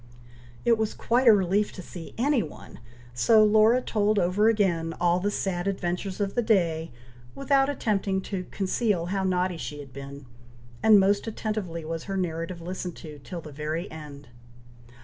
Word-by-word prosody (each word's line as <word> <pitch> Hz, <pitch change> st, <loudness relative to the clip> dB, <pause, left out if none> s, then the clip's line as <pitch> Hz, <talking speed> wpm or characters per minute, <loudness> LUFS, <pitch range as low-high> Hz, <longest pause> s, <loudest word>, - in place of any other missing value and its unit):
It 230 Hz, -2 st, +4 dB
was 220 Hz, -1 st, -1 dB
quite 245 Hz, +2 st, +1 dB
a -, -, +11 dB
relief 200 Hz, +1 st, +2 dB
to 185 Hz, -, -8 dB
see 170 Hz, -2 st, -10 dB
any 265 Hz, +1 st, +2 dB
one; 155 Hz, -, -10 dB, 0.3 s
so 215 Hz, -, +5 dB
Laura 220 Hz, +4 st, +4 dB
told 210 Hz, -1 st, +1 dB
over 195 Hz, +4 st, +3 dB
again 175 Hz, -7 st, +1 dB
all 175 Hz, 0 st, +3 dB
the 200 Hz, +3 st, 0 dB
sad 190 Hz, -3 st, -2 dB
adventures 185 Hz, 0 st, -3 dB
of 200 Hz, -1 st, -1 dB
the 240 Hz, -, +1 dB
day, 170 Hz, -8 st, +1 dB, 0.5 s
without 275 Hz, 0 st, +2 dB
attempting 200 Hz, -8 st, 0 dB
to 185 Hz, -2 st, -5 dB
conceal 195 Hz, -2 st, 0 dB
how 195 Hz, -1 st, 0 dB
naughty 180 Hz, -1 st, 0 dB
she 150 Hz, -2 st, -6 dB
had 140 Hz, -3 st, -11 dB
been; 140 Hz, +1 st, -9 dB, 0.6 s
and 215 Hz, -2 st, +7 dB
most 200 Hz, +3 st, +2 dB
attentively 210 Hz, -7 st, -4 dB
was 165 Hz, 0 st, -4 dB
her 195 Hz, -1 st, -3 dB
narrative 170 Hz, -1 st, -3 dB
listened 180 Hz, 0 st, -5 dB
to, 150 Hz, -3 st, -10 dB
till 170 Hz, +5 st, -7 dB
the 155 Hz, -, -10 dB
very 155 Hz, +5 st, -4 dB
end. 150 Hz, -4 st, -10 dB
190 Hz, 170 wpm, -26 LUFS, 165-215 Hz, 0.6 s, a